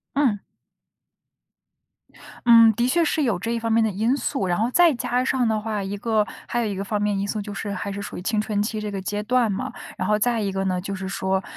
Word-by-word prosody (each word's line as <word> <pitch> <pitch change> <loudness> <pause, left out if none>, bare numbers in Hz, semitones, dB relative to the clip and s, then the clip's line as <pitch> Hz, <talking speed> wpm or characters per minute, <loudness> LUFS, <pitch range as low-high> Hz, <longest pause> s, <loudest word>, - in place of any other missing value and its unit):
嗯。 255 -8 +2 2.1
嗯， 230 -1 +9
的 240 +2 +1
确 335 +6 +3
是 310 -1 +1
有 230 -8 +1
这 230 +5 -2
方 230 0 -2
面 225 0 +4
的 220 - +2
因 220 +7 +1
素， 270 -8 -2
然 175 -1 +1
后 230 +4 0
再 345 0 +5
加 245 0 -1
上 260 -1 +1
的 220 -1 +1
话， 210 -2 -3
一 195 +1 -4
个 215 0 +1 0.2
还 240 - -1
有 - - 0
一 205 -2 -2
个 - - -3
方 205 +1 -2
面 205 -1 0
因 200 - -2
素， 210 +1 -2
就 205 0 -7
是 205 0 -4
还 200 - -4
是 200 +1 -5
属 205 - -7
于 - - -6
青 210 +3 0
春 210 -1 0
期 215 0 -3
这 210 0 -4
个 195 -1 -4
阶 205 +2 -3
段 240 -1 +2
嘛。 190 - -3 0.3
然 - - -2
后 210 0 +3
再 235 +2 +1
一 205 -2 -1
个 195 0 -2
呢， 185 -1 0
就 195 +2 -4
是 190 0 -5
说， 190 -1 -1
210 Hz, 270 characters per minute, -23 LUFS, 200-235 Hz, 2.1 s, 嗯